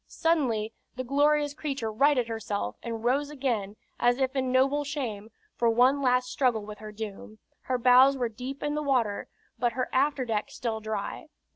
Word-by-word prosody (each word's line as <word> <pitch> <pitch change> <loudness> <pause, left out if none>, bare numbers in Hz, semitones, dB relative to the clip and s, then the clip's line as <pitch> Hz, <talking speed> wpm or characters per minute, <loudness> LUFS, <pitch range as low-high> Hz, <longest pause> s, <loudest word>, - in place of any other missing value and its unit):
Suddenly 245 -10 0 0.2
the 255 - -3
glorious 290 +2 +2
creature 275 -7 -3
righted 255 +1 +3
herself, 220 - -3
and 230 -1 -5
rose 275 +4 +1
again, 240 -9 -2 0.2
as 245 0 +3
if 265 0 0
in 260 -1 0
noble 275 +3 +3
shame, 245 -8 -4 0.3
for 235 - +2
one 250 +5 +4
last 250 -1 +2
struggle 240 -6 +1
with 210 0 -9
her 215 0 -8
doom. 215 0 -8 0.3
Her 255 - 0
bows 255 +3 +6
were 245 -2 0
deep 250 +5 -7
in 295 0 -1
the 300 - -1
water, 250 -8 0 0.3
but 240 0 +1
her 255 +1 -2
afterdeck 260 -6 +1
still 225 -3 -3
dry. 215 +6 -4
250 Hz, 170 wpm, -28 LUFS, 220-275 Hz, 0.3 s, bows